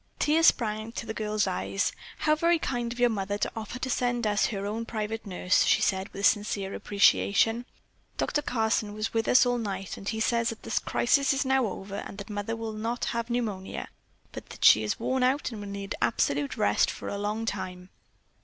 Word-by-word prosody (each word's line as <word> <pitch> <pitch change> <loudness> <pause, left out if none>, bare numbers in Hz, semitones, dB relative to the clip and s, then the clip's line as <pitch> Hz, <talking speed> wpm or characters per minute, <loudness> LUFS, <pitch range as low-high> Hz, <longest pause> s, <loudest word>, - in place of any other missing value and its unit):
Tears 320 +2 +4
sprang 215 -1 +1
to - - -5
the 220 - -4
girl's 215 -1 0
eyes. - - -1 0.3
"How 305 - +2
very 335 +2 +3
kind 240 -6 -2
of 245 - -7
your 245 -1 +4
mother 200 -1 -2
to - - -1
offer 225 +2 -5
to 260 - -3
send 245 -1 0
us 205 -1 +2
her 200 -2 -4
own 215 +3 -3
private 220 -1 -4
nurse," 180 -1 +2
she - - +4
said 190 -1 0
with 200 +1 -3
sincere 200 -2 +1
appreciation. 200 - +2 0.5
"Dr. 295 - 0
Carson 220 -5 0
was 215 +1 -3
with 225 -1 0
us 255 - +6
all 245 0 +1
night, 195 -4 -4
and 195 - -5
he 220 - -3
says 235 +1 +1
that 225 - -7
the - - -1
crisis 275 +3 +2
is 270 +1 0
now 265 -2 +2
over 195 0 -6
and 200 - -7
that 200 +1 -8
Mother 205 +2 -3
will 225 -1 -5
not 230 +3 -2
have 235 0 -2
pneumonia, 215 -6 -3 0.4
but - - -9
that - - -3
she 110 - +8
is 105 -1 -2
worn 260 0 0
out 260 +2 +1
and 215 -3 -7
will 205 - -7
need 200 0 -5
absolute 145 -9 0
rest 100 0 +3
for - - -6
a 200 - -3
long 210 +2 -2
time. 185 -3 -5
220 Hz, 210 wpm, -28 LUFS, 200-240 Hz, 0.5 s, she